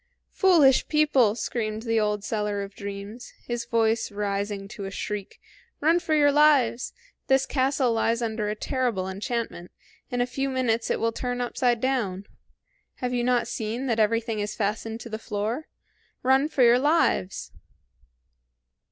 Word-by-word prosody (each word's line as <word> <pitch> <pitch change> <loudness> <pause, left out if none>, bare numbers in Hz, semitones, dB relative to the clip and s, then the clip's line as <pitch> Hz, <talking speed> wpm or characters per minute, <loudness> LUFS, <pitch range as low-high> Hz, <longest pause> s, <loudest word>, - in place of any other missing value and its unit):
"Foolish 320 -9 +5
people!" 285 -8 +3
screamed 220 -1 -3
the 225 -1 +1
old 210 -1 0
seller 210 -2 -2
of 200 0 -9
dreams, 200 +4 -8
his 240 -1 -3
voice 225 -1 +1
rising 200 0 -3
to 200 -1 -7
a - - -4
shriek, 200 0 -5 0.4
"Run 325 +4 +3
your 300 -2 +4
lives! 280 -5 +3 0.4
This 265 0 +3
castle 265 -2 +1
lies 230 +1 +1
under 220 -2 -2
a 210 - -2
terrible 235 -6 -1
enchantment; 195 -2 -4 0.4
in 245 - -2
a 245 - +3
few 270 +2 -2
minutes 245 -3 0
it - - 0
will 230 0 +1
turn 245 +1 -3
upside 245 -1 0
down. 220 -7 -1 0.7
Have 250 -1 -3
you 245 -1 0
not 245 -1 +2
seen 225 +4 -3
that 230 -4 0
everything 225 0 +1
is 205 +1 -3
fastened 220 +2 -2
to 235 - -8
the 220 0 -5
floor? 220 +8 -3 0.6
Run 265 +3 +3
for 265 - +2
your 240 +1 +6
lives!" 290 - +1
230 Hz, 150 wpm, -26 LUFS, 210-255 Hz, 0.7 s, your